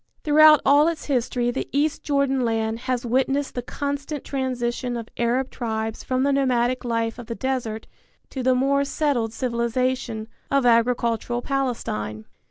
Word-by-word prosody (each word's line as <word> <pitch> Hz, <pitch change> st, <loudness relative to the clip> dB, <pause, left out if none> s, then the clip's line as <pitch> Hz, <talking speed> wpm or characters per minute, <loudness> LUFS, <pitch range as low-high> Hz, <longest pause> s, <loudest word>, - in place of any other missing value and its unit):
Throughout 305 Hz, -1 st, +7 dB
all 285 Hz, +3 st, +6 dB
its 335 Hz, -2 st, -2 dB
history 245 Hz, -2 st, 0 dB
the -, -, -4 dB
east 295 Hz, +3 st, 0 dB
Jordan 280 Hz, -3 st, +1 dB
land 225 Hz, -1 st, -1 dB
has 250 Hz, -1 st, 0 dB
witnessed 270 Hz, +3 st, 0 dB
the 245 Hz, -, -3 dB
constant 285 Hz, +3 st, -4 dB
transition 250 Hz, -2 st, -2 dB
of 230 Hz, -1 st, -7 dB
Arab 245 Hz, +3 st, 0 dB
tribes 220 Hz, -2 st, -3 dB
from 255 Hz, 0 st, 0 dB
the 280 Hz, 0 st, +2 dB
nomadic 255 Hz, -2 st, +1 dB
life 230 Hz, -1 st, -1 dB
of 240 Hz, -, -9 dB
the 230 Hz, -, -4 dB
desert 245 Hz, -5 st, -3 dB, 0.5 s
to 265 Hz, -, -4 dB
the 255 Hz, 0 st, +3 dB
more 275 Hz, +2 st, +2 dB
settled 275 Hz, -6 st, 0 dB
civilization, 235 Hz, -1 st, -1 dB, 0.2 s
of 275 Hz, -2 st, +2 dB
agricultural 235 Hz, 0 st, +2 dB
Palestine. 110 Hz, -, -2 dB
250 Hz, 150 wpm, -23 LUFS, 235-275 Hz, 0.5 s, Throughout